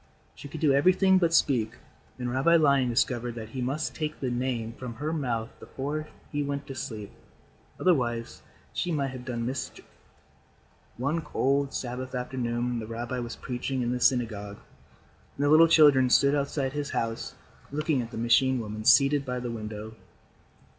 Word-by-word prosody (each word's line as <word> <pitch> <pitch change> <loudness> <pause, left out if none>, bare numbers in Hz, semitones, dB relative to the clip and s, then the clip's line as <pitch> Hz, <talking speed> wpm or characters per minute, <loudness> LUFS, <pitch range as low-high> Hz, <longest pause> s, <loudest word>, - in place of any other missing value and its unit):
She - - -10
could 150 +2 -8
do 150 -4 +4
everything 185 +6 +4
but 170 -2 +2
speak, 125 -9 +2 0.4
and 125 -1 -3
Rabbi 135 +7 +3
Lion 140 -5 +4
discovered 120 0 0
that 110 -2 -7
he 130 +2 -5
must 140 +5 -2
take 155 -1 -4
the 130 -2 -2
Name 120 -2 -2
from 120 -1 -7
her 150 +7 -3
mouth 120 -7 -2
before 150 +3 -4 0.2
he 145 - -1
went 140 0 -3
to 135 - -7
sleep. 110 -5 -6 0.7
Otherwise, 120 -10 0 0.3
she 175 - -1
might 140 -4 -1
have 130 -1 -8
done 120 -2 -3
mischief. 130 +2 -5 1.1
One 140 +7 -1
cold 140 -2 0
Sabbath 130 +1 -5
afternoon, 125 -1 -2
the 110 - -6
rabbi 120 +2 -4
was 120 -1 -5
preaching 125 0 -3
in 120 - -1
the 125 - -1
synagogue 110 -5 0 0.8
and 145 - 0
the - - +3
little 160 +2 +7
children 145 -6 +6
stood 140 +2 +5
outside 140 -1 -1
his 145 -1 -3
house 115 0 -3 0.4
looking 150 -2 0
at 115 - -6
the - - -8
machine 125 +3 +3
woman 110 -1 -5
seated 140 +2 +5
by 125 -2 -3
the 120 -1 -4
window. 110 -1 -6
130 Hz, 165 wpm, -27 LUFS, 120-145 Hz, 1.1 s, little